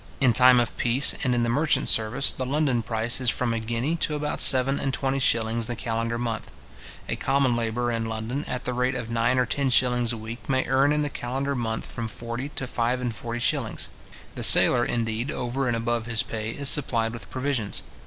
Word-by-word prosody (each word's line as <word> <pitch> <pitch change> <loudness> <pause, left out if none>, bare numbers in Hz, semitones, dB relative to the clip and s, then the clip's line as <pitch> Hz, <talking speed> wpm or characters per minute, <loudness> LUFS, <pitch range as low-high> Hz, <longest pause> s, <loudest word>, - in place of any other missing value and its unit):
In 130 -3 +3
time 125 +1 +6
of 120 - -2
peace, 120 +4 +3
and 125 -3 +1
in 120 - 0
the - - 0
merchant 150 +6 +1
service, 115 +5 +2
the 130 - -5
London 135 -2 0
price 115 +2 -1
is 125 - +1
from 120 -1 0
a 115 - -2
guinea 120 +8 -2
to 155 -2 -2
about 150 0 -3
seven 135 +1 +7
and 135 - -2
twenty 135 0 -2
shillings 115 -2 0
the 120 - -4
calendar 115 0 -3
month. 115 -2 -4 0.6
A - - -2
common 135 -3 0
labourer 120 +1 -2
in 115 -1 -3
London, 110 +5 -4
at 125 - -5
the 125 - -2
rate 125 +1 -1
of 120 -2 -5
nine 115 +2 +1
or 125 - +2
ten 135 +3 -1
shillings 125 -1 +2
a 115 - -4
week, 110 +4 -9
may 130 -1 +1
earn 135 +2 +2
in 150 0 0
the 145 - -2
calendar 135 +3 -3
month 115 -3 -3
from 115 -1 -6
forty 115 +5 -6
to 135 - -5
five 120 0 -2
and 120 -3 -4
forty 115 +1 -6
shillings. 125 -4 -2 0.4
The - - -7
sailor, 120 -1 +7
indeed, 115 +2 -3
over 130 -1 -3
and 120 -1 0
above 115 0 -2
his 115 0 -1
pay, 110 -2 -5
is 140 +4 -4
supplied 115 -6 +2
with 120 - -9
provisions. 130 -5 -3
120 Hz, 215 wpm, -24 LUFS, 115-130 Hz, 0.6 s, seven